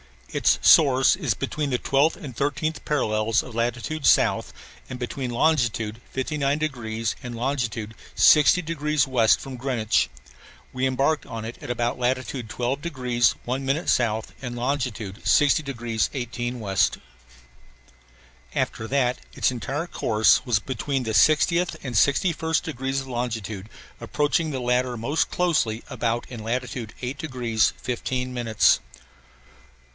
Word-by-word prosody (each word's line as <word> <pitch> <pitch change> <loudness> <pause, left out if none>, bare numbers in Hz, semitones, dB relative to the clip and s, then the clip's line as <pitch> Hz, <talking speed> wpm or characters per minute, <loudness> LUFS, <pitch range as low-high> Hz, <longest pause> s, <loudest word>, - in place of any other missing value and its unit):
Its - - +3
source 135 -3 +6
is 145 - 0
between 145 +9 -3
the 125 - +1
12th 140 +6 +2
and 140 - -9
13th 145 +4 -2
parallels 110 -6 +1
of 125 - -10
latitude 120 +6 -2
south, - - +3 0.4
and 130 - -5
between 125 +1 -4
longitude 120 -5 0
59 140 +1 -1
degrees 115 -7 -3
and 120 -1 -6
longitude 115 -4 -2 0.2
60 155 +4 +6
degrees 150 -3 0
west 120 -5 +3
from 135 -2 -7
Greenwich. 120 - +1 0.6
We 130 +1 0
embarked 135 +4 +1
on 115 -1 -6
it 115 - -8
about 120 0 -1
at - - -16
latitude 125 -1 -2
12 125 +4 -2
degrees 125 -7 +1
1 130 +3 -2
minute 140 +6 0
south 110 -2 +1
and 125 -2 -5
longitude 120 -5 -3
60 145 0 +4
degrees 120 -5 -2
18 120 -1 -4
west. 95 -2 +1 1.6
After 110 - -2
that 125 -1 +1
its - - +1
entire 135 +6 -3
course 110 -10 +2
was 120 -5 +2
between 135 +3 -3
the 110 - -3
60th 155 +9 +3
and 130 -3 -5
61st 160 - +2
degrees 135 -3 -2
of 135 - -10
longitude 110 -5 -4 0.3
approaching 150 +2 0
the 135 -3 -3
latter 125 0 +1
most 140 +8 0
closely 155 -11 0
about 115 0 -1
in 120 -3 -7
latitude 115 0 -4
8 130 +2 -4
degrees 125 -8 0
15 125 +1 -3
minutes. 115 -3 +3
125 Hz, 135 wpm, -24 LUFS, 115-140 Hz, 1.6 s, source